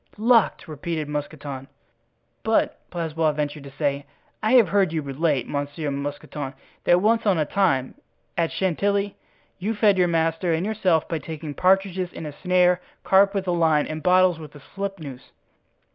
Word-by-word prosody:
"Locked!" 230 0 +3
repeated 155 0 -4
Mousqueton. 145 -2 -5 0.7
"But," 220 0 +1
Blaisois 160 -2 -1
ventured 145 -1 -3
to - - -8
say, 140 0 -2 0.3
"I 215 +3 +1
have 235 -8 +6
heard 195 -3 +2
you 160 -2 -2
relate, 140 0 0
Monsieur 145 +1 -3
Mousqueton, 140 0 -5 0.3
that 175 +1 +5
once 225 +1 +2
on 195 -4 +4
a 155 - +1
time, 140 -9 +1 0.4
at 165 -1 0
Chantilly, 200 +2 0 0.4
you 215 +5 -2
fed 205 -2 +3
your 180 - +4
master 165 +1 +1
and 165 +4 -2
yourself 190 -7 +1
by 165 - -2
taking 155 0 -7
partridges 185 +1 +1
in - - -7
a 150 - -5
snare, 180 +2 +2 0.2
carp 195 +1 +4
with 190 -1 -2
a - - +2
line, 160 -3 +3
and 155 0 -5
bottles 180 -1 +4
with 150 -2 -11
a - - -10
slipnoose." 190 -10 -6
165 Hz, 160 wpm, -24 LUFS, 150-190 Hz, 0.7 s, have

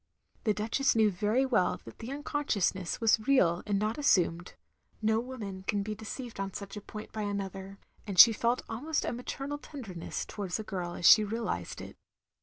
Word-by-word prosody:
The 215 - +3
Duchess 225 +6 +1
knew 220 -2 +4
very 210 +8 +1
well 240 -8 +1
that - - -12
the 230 - -7
tmcon 280 +3 -5 0.2
sciousness 190 -6 0
was 225 -1 +4
real 180 -11 +4
and 205 -1 +1
not 215 +2 -1
asstuned; 175 - +2 0.5
no 220 0 +2
woman 225 -6 -6
can 205 -2 0
be 215 +1 -3
deceived 225 +2 -7
on 195 -1 -3
such 200 0 -7
a 210 - -6
point 210 +1 -9
by 220 - -4
another; 195 -1 -4 0.3
and 195 -3 -4
she 230 +5 +10
felt 235 +3 0
almost 290 +8 -2
a - - -2
maternal 275 +4 -5
tenderness 220 - -6
towards 195 -4 -4
the 220 - -5
girl 180 -4 -4
as 175 - -4
she 215 - +9
realised 225 +2 -3
it. - - -10
215 Hz, 190 wpm, -30 LUFS, 195-235 Hz, 0.5 s, she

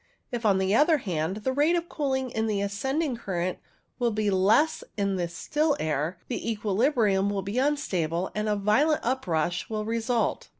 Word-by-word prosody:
If, 235 -2 -1
on 195 -2 +4
the 190 +1 +1
other 305 +7 +5
hand, 180 - -2
the 260 - 0
rate 295 +5 +3
of 340 0 -1
cooling 265 -5 -2
in 220 -1 -1
the 210 -2 0
ascend 205 +10 -1
ing 265 -7 -2
current 185 -5 -3 0.6
be 210 -1 +1
less 215 +12 +3 0.2
than 200 -1 0
in 195 - -1
the 175 -1 -1
still 295 - 0
air, 155 +3 -1
the 235 -2 -2
equi 210 -1 -3
librium 205 -4 +2
will 195 -1 -2
be 200 +6 -2
unstable, 185 - 0
and 210 0 -1
a 210 - +2
violent 240 +10 +2
uprush 175 -10 -1
will 215 -1 -3
result. 230 +1 -1
215 Hz, 185 wpm, -27 LUFS, 190-265 Hz, 0.6 s, other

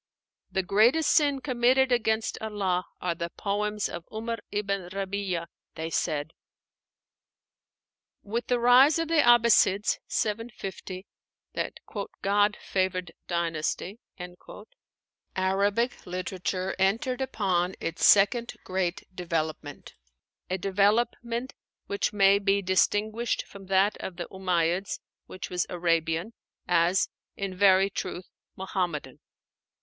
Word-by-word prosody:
"The 190 - -1
greatest 230 - +4
sin 285 -3 +3
committed 255 0 +2
against 220 -2 +1
Allah 195 -4 -1
are 180 -1 -1
the 170 0 -4
poems 210 +2 -2
of 170 - -7
'Umar 230 +1 -4
ibn 200 -3 -2
Rabí'a," 195 -2 -3 0.3
they 160 +1 -4
said. 155 -2 -1 1.9
With 230 +4 -3
the 245 - +2
rise 250 +6 +6
of 330 -1 -2
the 330 -2 +4
Abbassides 235 -4 +4
(750), 205 -4 -4 0.5
that - - -3 0.5
"God 205 +1 +3
favored 185 -2 -1 0.2
dynasty," 170 +4 -2 1.4
Arabic 200 +6 0
literature 185 +1 -3
entered 230 +7 +1
upon 190 -8 0
its 165 - -4
second 230 +4 +5
great 185 -1 -2
development; 160 -4 -4 0.6
a 185 - 0
development 230 +6 0 0.3
which 200 - -1
may 200 -1 +5
be 200 0 +1
distinguished 210 +5 +1
from 195 -1 -13
that 195 +2 +3
of 185 - -6
the 175 -1 -5
Umáyyids 180 0 0 0.3
(which 185 - -8
was 180 0 0
Arabian) 165 +3 0 0.3
as, 175 +2 +3 0.3
in 195 -1 -3
very 195 +1 +4
truth, 180 -1 -5 0.3
Muhammadan. 175 -8 -3
195 Hz, 105 wpm, -27 LUFS, 180-220 Hz, 1.9 s, rise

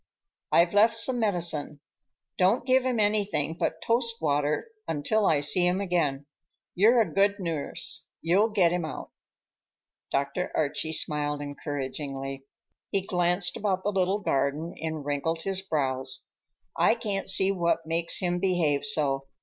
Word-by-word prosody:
I've 170 +2 +4
left 225 +3 +4
some 245 +2 0
medicine. 170 -8 -1 0.6
Don't 195 +7 +3
give 260 0 +3
him 245 -3 0
anything 205 -7 +1
but 160 -1 -2
toast 230 0 +1
water 150 - 0 0.2
until 205 +8 +1
I 145 -2 +3
see 175 +5 +3
him 180 +2 +1
again. 160 -8 0 0.5
You're 230 +6 +5
a 220 - -2
good 200 +1 +3
nurse; 165 -6 -1
you'll 190 +7 +2
get 190 -6 +3
him 175 -1 -1
out." 155 - -6 1.0
Dr. 140 +6 -1
Archie 155 +1 0
smiled 150 -2 -1
encouragingly. 135 -1 -5 0.4
He 195 - 0
glanced 180 0 +1
about 190 -3 -1
the 205 - 0
little 190 0 +1
garden 140 +1 -1
and 160 -2 -4
wrinkled 160 +3 -2
his 195 -1 -1
brows. 135 -7 -2 0.5
"I - - +4
can't 205 -5 -3
see 190 0 +3
what 170 -3 0
makes 165 +1 +1
him 175 -1 -1
behave 175 -6 +1
so. 140 -9 0
175 Hz, 140 wpm, -27 LUFS, 145-200 Hz, 1.0 s, You're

